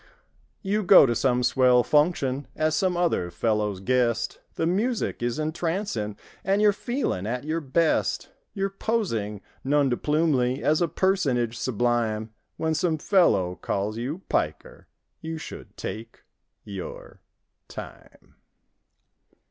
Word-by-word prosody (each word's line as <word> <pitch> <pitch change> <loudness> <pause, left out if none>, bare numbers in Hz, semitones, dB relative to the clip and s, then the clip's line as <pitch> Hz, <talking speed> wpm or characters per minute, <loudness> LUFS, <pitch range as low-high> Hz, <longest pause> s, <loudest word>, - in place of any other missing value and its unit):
You 205 +2 0
go 190 -5 +8
to 120 - +1
some 125 +1 +1
swell 125 -1 +4
function 145 -3 +1
As 155 0 +1
some 180 +1 +1
other 170 - +1
fellow's 105 -1 -1
guest; 120 +1 0 0.2
The 165 - 0
music 215 - 0
is 120 +2 -1
entrancing 155 - -2 0.3
And 195 +1 +2
you're 210 -1 +5
feeling 240 - -2
at 125 +3 -2
your 160 +2 -2
best; 160 +3 0 0.2
You're 195 0 -1
posing 115 - -2 0.2
non 145 0 +2
de 120 - +1
plumely 145 -5 +1
As 155 +2 +2
a 170 - +3
personage 140 - +1
sublime. 115 -2 -1 0.2
When 160 0 0
some 160 0 +1
fellow 105 - +2
calls 105 +3 -2
you 145 +10 -4
"piker"— - - -2 0.3
You 160 0 -4
should—take—^your—time. 110 - -10
140 Hz, 115 wpm, -25 LUFS, 115-175 Hz, 0.3 s, go